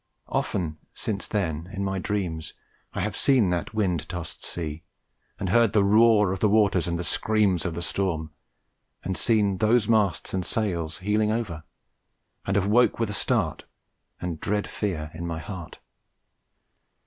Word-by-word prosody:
Often 80 -3 -1 0.2
since 100 -2 -3
then 85 -5 -2
in 100 -1 -3
my 95 -1 -1
dreams 90 -6 -3 0.4
I - - -2
have - - -2
seen 125 -9 +3
that 90 +5 -2
wind 90 -7 0
tossed 85 -2 -6
sea, 80 -2 -5 0.6
and 95 - -2
heard 115 +1 +4
the 105 -2 +4
roar 105 -1 +5
of 95 - -2
the 105 - +3
waters 100 -5 +3
and 85 0 -1
the 90 - -3
screams 100 +1 +1
of 85 - -4
the 85 - -3
storm, 80 -4 -1 0.7
and 95 - -2
seen 105 -4 +2
those 110 0 +3
masts 100 -10 +1
and 95 -1 0
sails 85 -7 -1
heeling 105 +1 +2
over, 95 -9 -3 0.8
and 95 - +1
have 100 -2 +2
awoke 120 +5 +4
with 115 -3 -1
a - - -3
start - - 0 0.5
and 85 -3 -4
dread 105 +3 0
fear 80 -7 -3
in 85 +1 -5
my 85 -1 -3
heart. 90 0 -7
95 Hz, 160 wpm, -26 LUFS, 85-105 Hz, 0.8 s, roar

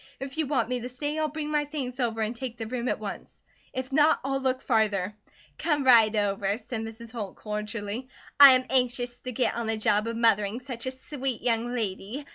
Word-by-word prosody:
If 270 +1 -6
you 310 - +1
want 255 -6 +1
me 250 0 -1
to 245 +1 -6
stay, 290 +4 -3
I'll 310 - +1
bring 300 0 -4
my 300 -1 +2
things 275 -4 -5
over 225 -3 0
and 220 +2 -1
take 245 -1 -6
the 225 - -4
room 245 +2 -3
at - - 0
once. - - -8 0.3
If 260 +1 -5
not, 300 +3 +4
I'll 270 0 -1
look 260 -1 +1
farther." 210 -4 +1 0.4
"Come 295 -4 +1
right 230 -4 +6
over," 200 -1 0
said 240 -1 -5
Mrs. 225 +1 -8
Holt, 215 -5 -5
cordially. 210 +2 -4 0.3
"I 280 -2 +12
am 255 0 +2
anxious 245 -1 0
to 255 - -6
git 250 +1 +1
on 235 -1 -3
the 220 0 0
job 210 0 +2
of 230 0 -3
mothering 220 -1 +2
such 250 -2 -5
a - - 0
sweet 260 -2 -5
young 240 0 0
lady. 220 +5 -4
245 Hz, 215 wpm, -27 LUFS, 220-265 Hz, 0.4 s, I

